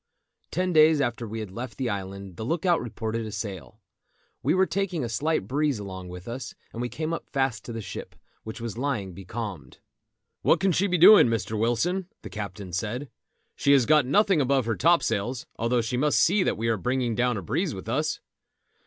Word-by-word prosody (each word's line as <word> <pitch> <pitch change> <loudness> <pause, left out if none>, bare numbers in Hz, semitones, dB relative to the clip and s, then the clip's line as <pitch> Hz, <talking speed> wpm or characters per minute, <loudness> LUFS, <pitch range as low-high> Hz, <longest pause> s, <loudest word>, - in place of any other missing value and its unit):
Ten 180 +1 -1
days 155 -1 +6
after 120 -3 -1
we 110 +1 -5
had 105 -4 -7
left 120 +3 -7
the 130 - -1
island 100 -2 -5
the 110 - -6
look 165 +8 -2
out 175 -2 +3
reported 115 0 -3
a 110 - -6
sail. 100 - -6 0.6
We - - +2
were 190 0 +4
taking 180 -3 -2
a - - -1
slight 145 -3 0
breeze 145 +1 +1
along 95 -3 -7
with 90 +2 -9
us, 120 +1 -6 0.2
and 115 - -4
we 120 - -2
came 160 +4 -3
up 165 - -5
fast 135 -4 -1
to - - -6
the 115 -1 -5
ship, - - -8 0.3
which 110 +3 -7
was 115 -1 -5
lying 115 -9 -2
becalmed. 95 -2 -7 0.6
"What - - +4
can 195 0 +2
she 190 +4 +2
be 180 -1 +1
doing, 195 - +9
Mr. 115 -1 -1
Wilson?" 165 - 0 0.2
the - - -8
captain 100 -3 -6
said. 115 - -3 0.4
"She 140 - +3
has 135 -4 +5
got 150 0 +4
nothing 195 +1 +4
above 135 -2 +2
her 115 - 0
topsails, 130 -7 +1
although 120 +1 +2
she 115 +2 -2
must 150 +3 +2
see 195 +4 +4
that - - +1
we 115 +2 -1
are 115 -1 +2
bringing 125 +3 0
down 125 0 +1
a 95 - -5
breeze - - -1
with - - -9
us." - - -1
120 Hz, 205 wpm, -26 LUFS, 110-155 Hz, 0.6 s, doing